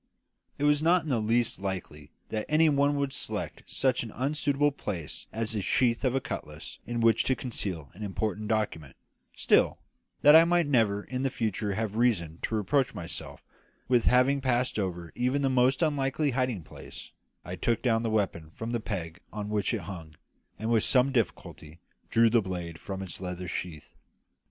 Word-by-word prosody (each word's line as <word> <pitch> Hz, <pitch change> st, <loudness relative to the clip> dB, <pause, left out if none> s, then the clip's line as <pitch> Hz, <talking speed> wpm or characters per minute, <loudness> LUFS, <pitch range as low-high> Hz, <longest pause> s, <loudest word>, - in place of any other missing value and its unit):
It -, -, -3 dB
was 145 Hz, 0 st, +4 dB
not 170 Hz, +2 st, +4 dB
in 160 Hz, -, -6 dB
the 125 Hz, -4 st, +1 dB
least 115 Hz, +2 st, +1 dB
likely 90 Hz, -7 st, -5 dB, 0.2 s
that 110 Hz, -1 st, -3 dB
any 155 Hz, +1 st, +5 dB
one 145 Hz, 0 st, +2 dB
would 140 Hz, -1 st, -1 dB
select -, -, -4 dB
such 130 Hz, -2 st, +1 dB
an 115 Hz, -, -5 dB
unsuitable 145 Hz, +3 st, +1 dB
place 95 Hz, -, -6 dB
as 115 Hz, 0 st, -2 dB
the 105 Hz, -2 st, -1 dB
sheath 120 Hz, +5 st, +1 dB
of 130 Hz, -1 st, +1 dB
a -, -, +3 dB
cutlass -, -, -7 dB
in 120 Hz, -1 st, -2 dB
which 115 Hz, -1 st, +4 dB
to 130 Hz, -, +2 dB
conceal 95 Hz, -, -4 dB
an 100 Hz, -, -13 dB
important 105 Hz, +1 st, -2 dB
document; 100 Hz, -10 st, -2 dB, 0.4 s
still, -, -, +3 dB, 0.5 s
that 150 Hz, +1 st, +9 dB
I 165 Hz, -, +10 dB
might 175 Hz, 0 st, +3 dB
never 110 Hz, -7 st, +2 dB
in 130 Hz, 0 st, -4 dB
the 135 Hz, -, +1 dB
future 105 Hz, -4 st, -2 dB
have 110 Hz, 0 st, -2 dB
reason 85 Hz, -10 st, +1 dB
to 110 Hz, -, -2 dB
reproach 130 Hz, +6 st, +1 dB
myself 85 Hz, -, -7 dB, 0.4 s
with 125 Hz, -2 st, +3 dB
having 130 Hz, +3 st, +4 dB
passed 125 Hz, -3 st, 0 dB
over 90 Hz, -4 st, -3 dB
even 130 Hz, +3 st, 0 dB
the 135 Hz, -, +2 dB
most 130 Hz, +4 st, +3 dB
unlikely 145 Hz, -1 st, +1 dB
hiding 125 Hz, -7 st, -1 dB
place, -, -, -11 dB, 0.3 s
I 90 Hz, +2 st, -5 dB
took 115 Hz, +6 st, 0 dB
down 115 Hz, -3 st, +2 dB
the 115 Hz, -, -1 dB
weapon 95 Hz, -7 st, -1 dB
from 115 Hz, +1 st, -5 dB
the 120 Hz, -, 0 dB
peg 90 Hz, -7 st, -5 dB
on 105 Hz, -1 st, -5 dB
which 105 Hz, -2 st, 0 dB
it -, -, -2 dB
hung, 80 Hz, -6 st, -9 dB, 0.4 s
and 110 Hz, +1 st, -2 dB
with 115 Hz, -2 st, +3 dB
some 130 Hz, +1 st, +3 dB
difficulty 85 Hz, -, -3 dB, 0.3 s
drew 115 Hz, 0 st, +4 dB
the 115 Hz, -1 st, +4 dB
blade 90 Hz, -3 st, -5 dB
from 95 Hz, 0 st, -5 dB
its 90 Hz, -1 st, -6 dB
leather 90 Hz, 0 st, -5 dB
sheath. 80 Hz, -4 st, -6 dB
115 Hz, 185 wpm, -28 LUFS, 95-130 Hz, 0.5 s, I